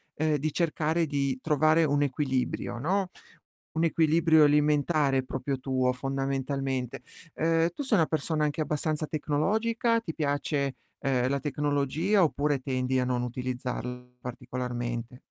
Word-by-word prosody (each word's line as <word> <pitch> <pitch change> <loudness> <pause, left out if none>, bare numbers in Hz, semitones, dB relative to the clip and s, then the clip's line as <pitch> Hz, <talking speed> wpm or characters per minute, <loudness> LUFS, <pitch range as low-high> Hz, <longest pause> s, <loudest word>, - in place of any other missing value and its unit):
ehm, 155 0 +1
di 155 +2 -1
cercare 165 0 +1
di 140 -3 -1
trovare 155 +2 +3
un 145 -1 +2
equilibrio, 130 -3 -1
no, 185 +7 0 0.7
un 160 +1 +1
equilibrio 160 0 +4
alimentare 150 -1 +3
proprio 130 +1 -3
tuo 130 -1 +1
fondamentalmente. 135 -1 -2 0.3
Ehm, 165 +1 +2
tu 285 - -5
sei 230 -6 +2
una 160 - +4
persona 155 0 -1
anche 150 +1 0
abbastanza 155 +1 -1
tecnologica? 220 +11 +1
Ti 185 -8 -5
piace, 145 -2 -1 0.3
ehm, 130 -2 +1
la 140 +1 0
tecnologia, 145 +7 +1
oppure 145 -3 +1
tendi 130 -1 -1
a - - +1
non 125 -1 0
utilizzarli 125 0 -5
particolarmente? 125 -1 -5
145 Hz, 130 wpm, -28 LUFS, 130-155 Hz, 0.7 s, equilibrio